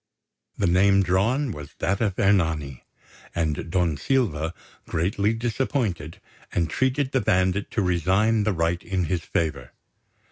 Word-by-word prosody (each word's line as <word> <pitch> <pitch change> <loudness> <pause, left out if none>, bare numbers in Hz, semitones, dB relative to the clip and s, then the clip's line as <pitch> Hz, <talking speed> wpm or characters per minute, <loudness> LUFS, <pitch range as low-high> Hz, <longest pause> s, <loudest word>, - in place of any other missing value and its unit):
The 100 - +1
name 95 +2 +4
drawn 110 +10 +1
was 75 -5 -9
that 100 +4 -1
of 100 -5 0
Ernani; 80 -9 +1 0.5
and 80 -1 -1
Don 85 -4 +1
Silva, 80 - 0 0.4
greatly 100 +6 0
disappointed, 115 - -2 0.4
entreated 130 - 0
the 130 - +1
bandit 95 +1 +1
to 105 - -1
resign 95 +5 +2
the 105 0 +1
right 85 0 0
in 95 -3 -2
his 90 +1 -1
favour. 75 -6 -2
95 Hz, 130 wpm, -24 LUFS, 80-110 Hz, 0.5 s, name